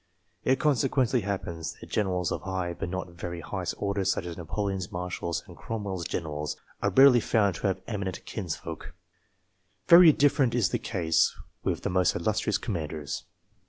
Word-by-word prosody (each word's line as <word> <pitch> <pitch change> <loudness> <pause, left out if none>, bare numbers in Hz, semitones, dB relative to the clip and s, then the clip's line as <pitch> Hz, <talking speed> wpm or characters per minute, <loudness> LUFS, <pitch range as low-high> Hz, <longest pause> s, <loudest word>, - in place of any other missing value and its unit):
It 130 +1 +2
con 150 -1 +4
sequently 130 -2 +1
happens 95 -5 -4
that - - -12
generals 90 -4 0
of - - -2
high, 95 -2 -2
but 85 - -5
not 95 +1 -3
the 85 - -16
very 85 0 -6
highest - - -4
order, 100 -1 -1
such 95 -2 0
as 85 -1 -5
Napoleon's 95 +2 -3
marshals 90 -1 -3
and 90 -4 -13
Cromwell's 100 -4 -4
generals, 75 -3 -3 0.2
are - - +2
rarely 135 -2 +7
found 105 -4 +2
to - - -1
have 95 - -1
eminent 100 -5 -4
kinsfolk. 90 -7 -6 0.9
Very 170 -1 +10
different 140 -4 +3
is 120 -5 +3
the - - -1
case, 85 -6 +1 0.3
with - - -1
the - - -1
most 90 -2 +2
illustrious 105 +3 0
commanders. 75 -6 -4
95 Hz, 165 wpm, -28 LUFS, 85-110 Hz, 0.9 s, Very